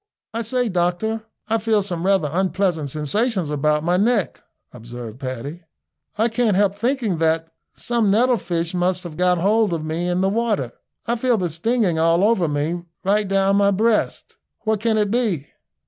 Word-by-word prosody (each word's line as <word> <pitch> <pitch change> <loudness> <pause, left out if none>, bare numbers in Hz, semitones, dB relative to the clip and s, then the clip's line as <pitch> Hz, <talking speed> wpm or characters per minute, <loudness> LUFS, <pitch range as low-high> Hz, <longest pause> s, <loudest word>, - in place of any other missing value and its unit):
"I 230 - -2
say, 245 +2 0
doctor, 205 +4 -1 0.2
I 225 +1 +1
feel 215 -1 +1
some 180 -2 -3
rather 195 -6 +3
unpleasant 180 -4 0
sensations 175 - -1
about 150 +1 +1
my 175 +2 +2
neck," 210 -1 +1 0.3
observed 120 0 -9
Paddy. 135 +5 -6 0.6
"I 220 +2 +3
can't 225 -3 +1
help 200 0 +3
thinking 225 - -1
that 165 0 +1 0.2
some 235 -4 0
nettle 240 +4 +3
fish 170 -3 -3
must 180 +1 0
have 170 -3 -8
got 180 +1 +2
hold 205 +2 +2
of 160 -2 -3
me 165 +3 -2
in 180 +1 0
the 190 - +2
water. 210 - 0 0.3
I 235 +1 0
feel 245 0 +2
the 180 -4 -2
stinging 185 0 0
all 165 +3 +3
over 205 -5 +3
me, 150 +4 -1 0.2
right 205 +2 +1
down 195 0 +2
my 200 0 +4
breast. 215 +3 0 0.3
What 220 -1 0
can 220 0 +1
it 210 -2 +1
be?" 215 - 0
190 Hz, 175 wpm, -21 LUFS, 165-220 Hz, 0.6 s, my